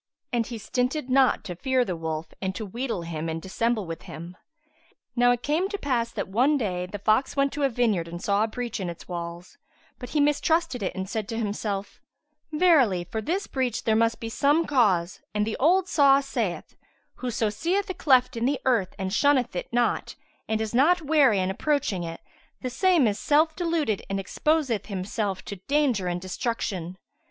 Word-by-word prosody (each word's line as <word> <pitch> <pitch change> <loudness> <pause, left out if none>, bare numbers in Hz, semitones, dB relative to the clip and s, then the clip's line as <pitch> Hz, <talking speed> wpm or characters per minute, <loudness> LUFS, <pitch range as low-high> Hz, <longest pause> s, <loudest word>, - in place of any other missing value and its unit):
And 235 -2 +1
he 235 - -5
stinted 250 +5 -2
not 265 0 +4
to 180 -4 -6
fear 260 +5 +1
the 185 - -3
wolf 160 -1 -4
and 190 -1 -2
to 215 - -4
wheedle 230 -2 -3
him 165 -1 -4
and 160 0 -3
dissemble 215 +4 -1
with 165 -1 -6
him. 170 +3 -9 0.8
Now 245 0 +4
it 245 -1 +1
came 325 +7 +1
to 405 - -3
pass 245 -8 0
that - - -3
one 255 +10 +3
day, 180 -7 -2
the 205 - -6
fox 215 +6 +1
went 275 0 +1
to 295 - -4
a 275 - +3
vineyard 220 -8 +1
and 170 +1 -7
saw 200 +3 +1
a - - +1
breach 240 0 -4
in 185 -3 -3
its 170 - -9
walls; 170 0 -7 0.4
but 250 - -7
he 305 - 0
mistrusted 295 0 +2
it 190 - -2
and 190 0 -4
said 215 +1 -3
to 225 - -3
himself, 205 -2 -3 0.5
"Verily, 300 - +4
for 220 +6 -4
this 360 - -1
breach 255 -4 -2
there 220 - +2
must 230 +1 +2
be 230 - -5
some 290 +8 +2
cause 200 -11 +2
and 210 0 +2
the 220 - -2
old 360 +6 +4
saw 275 -5 +5
saith, 240 -10 -3 0.4
'Whoso 230 -4 -1
seeth 370 - -1
a 375 - -3
cleft 260 -8 +3
in 230 0 -1
the 275 +1 +1
earth 225 -8 +1
and 190 -1 -3
shunneth 260 -4 +3
it 175 - -4
not 240 0 0 0.3
and 220 0 0
is 220 0 -3
not 320 +8 +4
wary 285 -7 +4
in 185 0 0
approaching 250 -5 0
it, 165 0 -6 0.4
the 255 - -3
same 345 +1 +3
is 210 -1 0
self 315 +2 +3
deluded 330 - 0
and 195 0 -1
exposeth 265 +2 0
himself 195 0 -3
to 200 - -6
danger 270 -10 +2
and 175 0 -1
destruction.' 185 -3 -3
230 Hz, 195 wpm, -26 LUFS, 190-280 Hz, 0.8 s, saw